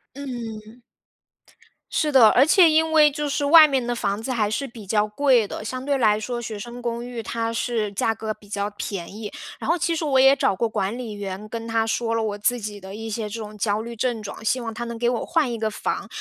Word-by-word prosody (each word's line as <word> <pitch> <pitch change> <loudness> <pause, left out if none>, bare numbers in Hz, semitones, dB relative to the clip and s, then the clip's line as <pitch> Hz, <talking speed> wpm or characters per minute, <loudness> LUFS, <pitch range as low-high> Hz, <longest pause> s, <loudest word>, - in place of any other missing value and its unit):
嗯。 235 -4 -7 1.1
是 305 - +1
的， 250 -6 +7
而 255 +5 +5
且 345 +2 +6
因 320 +1 +3
为 305 -2 +6
就 295 +1 -3
是 285 0 -1
外 310 +1 +9
面 265 -4 0
的 240 0 -1
房 200 -2 -2
子 255 - -4
还 220 -4 +1
是 275 +6 -2
比 230 -4 -11
较 210 +2 +1
贵 240 0 +3
的， 210 - -7
相 255 +3 -4
对 280 0 0
来 215 -4 +3
说 240 +2 -4
学 225 -2 -5
生 240 +3 -8
公 235 0 -3
寓 245 -2 -6
它 230 +1 -2
是 230 -2 -1
价 225 +3 +1
格 220 -1 -5
比 210 -1 -20
较 200 0 -2
便 195 -3 -6
宜， 215 -1 -6 0.3
然 - - -6
后 335 - +4
其 335 -1 0
实 320 - -2
我 270 -3 +3
也 270 +1 +7
找 195 - +1
过 230 +4 0
管 205 0 -2
理 240 -4 -6
员 205 +1 -6
跟 230 0 -5
他 225 0 0
说 230 0 -1
了 230 - +1
我 210 -2 -2
自 245 +4 0
己 205 -1 -6
的 190 0 -10
一 225 +1 -6
些 215 0 -3
这 220 +2 -6
种 215 -1 -8
焦 210 +1 0
虑 235 +1 -7
症 235 -1 -1
状， 210 +1 -8
希 250 +3 +1
望 225 -1 -4
他 230 +2 -5
能 235 -1 -6
给 240 0 +2
我 240 - -2
换 320 -7 +1
一 235 - -3
个 220 0 -1
房， - - -3
230 Hz, 270 characters per minute, -23 LUFS, 215-255 Hz, 1.1 s, 外